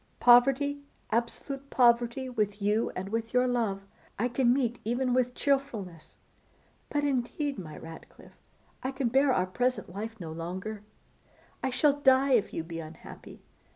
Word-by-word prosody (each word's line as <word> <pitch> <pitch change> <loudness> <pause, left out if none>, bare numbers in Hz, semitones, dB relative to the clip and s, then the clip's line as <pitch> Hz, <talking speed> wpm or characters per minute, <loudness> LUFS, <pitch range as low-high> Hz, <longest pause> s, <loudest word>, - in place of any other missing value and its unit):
Poverty, 270 +4 +5 0.3
absolute 270 +4 -2
poverty, 240 +1 +3
with 210 -5 -2
you 210 +3 +1
and 190 +1 -4
with 230 +2 -3
your 250 0 +4
love, 225 -6 -1 0.3
I 245 +4 0
can 245 0 +2
meet 245 -2 0
even 245 +3 0
with 250 0 +1
cheerfulness; 220 - -2 0.7
but 290 0 -1
indeed, 280 0 -1
my 155 -4 -8
Ratcliffe, 165 0 -13 0.4
I 260 +1 -3
can 260 -2 -1
bear 270 +3 +4
our 185 -7 +2
present 245 0 -2
life 220 +3 -6
no 165 -3 -6
longer; 185 +6 -5 0.8
I 265 - 0
shall 280 +3 +2
die 265 0 +5
if 235 -6 +3
you 165 - -3
be 165 0 -7
unhappy. 160 0 -11
240 Hz, 150 wpm, -29 LUFS, 200-265 Hz, 0.8 s, Poverty